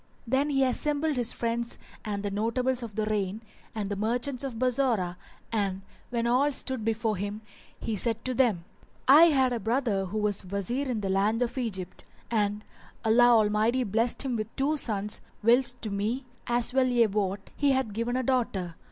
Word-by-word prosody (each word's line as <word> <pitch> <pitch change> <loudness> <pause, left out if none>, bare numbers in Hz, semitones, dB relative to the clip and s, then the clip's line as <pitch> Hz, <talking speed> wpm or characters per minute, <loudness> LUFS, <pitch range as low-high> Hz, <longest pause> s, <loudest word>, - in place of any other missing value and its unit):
Then 265 +5 +1
he 270 -2 +2
assembled 295 +3 +1
his 240 -2 +1
friends 235 0 -2 0.3
and 205 -1 -3
the 205 - -2
notables 240 +5 0
of 225 -4 -7
the 215 - 0
reign 210 -1 -2 0.3
and 210 -2 -2
the - - -1
merchants 245 +6 -1
of 260 -4 -4
Bassorah 240 -8 +1 0.4
and 195 -4 -1 0.3
when 235 -1 -1
all 255 +5 +3
stood 260 -3 -1
before 225 -1 0
him 205 +3 -4 0.4
he 225 - -2
said 230 +3 +2
to 255 - -1
them, 230 -10 +1 0.4
"I 295 +5 +9
had 265 -6 +3
a 235 - -1
brother 225 -4 0
who 195 +4 -5
was 210 -2 0
Wazir 200 +9 -3
in 230 -4 -1
the 195 - -2
land 210 +5 +2
of 240 - -4
Egypt, 195 -8 -4 0.3
and 210 -2 0 0.4
Allah 240 +2 +6
Almighty 220 +2 +3
blessed 230 +5 +1
him 260 -3 -2
with 215 -1 -3
two 285 +3 +1
sons, 210 -6 -1 0.2
whilst 245 +2 +3
to 215 - -3
me, 220 +7 -2 0.2
as 240 +1 +1
well 260 -1 +3
ye 240 -2 +4
wot, 200 -1 -2
He 285 -1 +2
hath 260 -5 -1
given 230 +3 -2
a 260 - 0
daughter. 225 -9 -1
230 Hz, 185 wpm, -28 LUFS, 210-255 Hz, 0.4 s, I